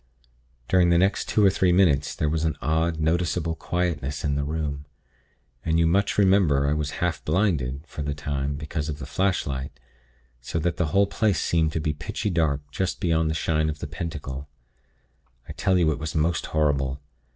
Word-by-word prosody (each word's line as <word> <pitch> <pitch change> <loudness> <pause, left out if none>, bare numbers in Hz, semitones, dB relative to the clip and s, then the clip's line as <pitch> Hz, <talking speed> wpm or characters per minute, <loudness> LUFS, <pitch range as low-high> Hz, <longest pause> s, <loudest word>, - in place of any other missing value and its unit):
"During 90 -2 +4
the 85 - +4
next 95 +3 +1
two 105 - +3
or 95 - +6
three 95 -1 +2
minutes, 80 -6 +3
there 75 - 0
was 80 +1 0
an 80 -1 0
odd, 80 +1 0
noticeable 80 +1 0
quietness 80 -5 -2
in 70 - 0
the 70 0 0
room, 75 -1 -3 0.8
and 80 0 +1
you 85 - +4
much 100 +5 +2
remember 95 -8 +4
I 70 - +2
was 75 -1 -2
half 90 - -2
blinded, 75 -7 0
for 80 - -8
the 75 0 -2
time, 70 -1 -2
because 75 +1 -4
of 75 - -4
the 70 - -7
flashlight; 70 -5 -2 0.6
so 65 - -4
that 85 +1 -1
the 90 - +1
whole 100 +6 +3
place 100 0 +1
seemed 80 -2 +1
to - - 0
be 75 0 -1
pitchy 80 +8 -3
dark 80 -4 +1
just 95 +5 -2
beyond 80 -4 +1
the 80 - -1
shine 80 0 +1
of 75 - -4
the - - -6
Pentacle. 70 -4 -6 1.0
I - - -7
tell 95 -3 +1
you 80 -3 +3
it 75 - -3
was 80 +1 -5
most 80 +2 0
horrible. 70 -3 0
80 Hz, 190 wpm, -25 LUFS, 75-85 Hz, 1.0 s, or